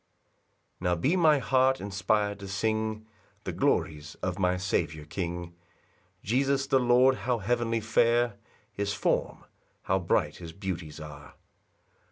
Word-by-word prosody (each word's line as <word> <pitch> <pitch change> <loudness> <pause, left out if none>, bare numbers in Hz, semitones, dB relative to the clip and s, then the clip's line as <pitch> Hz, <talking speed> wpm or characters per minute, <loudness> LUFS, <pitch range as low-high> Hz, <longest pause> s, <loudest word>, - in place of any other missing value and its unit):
1 90 - -7
Now 90 - +2
be 135 - +1
my 160 -4 +5
heart 130 0 +3
inspir'd 100 +1 0
to 100 - -8
sing 110 +2 -1 0.4
The - - -3
glories 75 0 0
of 90 +1 -2
my 90 -1 +2
Saviour 80 -4 -1
king, 85 +1 -4 0.7
Jesus 135 +4 +1
the 135 -1 +3
Lord; 125 +2 +4
how 125 -1 0
heavenly 115 +1 0
fair 115 +2 +2 0.4
His 100 0 -2
form! - - -1 0.4
how 95 0 +1
'bright 85 - 0
his 85 -2 -9
beauties 85 -5 -5
are! 75 -2 -10
100 Hz, 135 wpm, -28 LUFS, 90-120 Hz, 0.7 s, my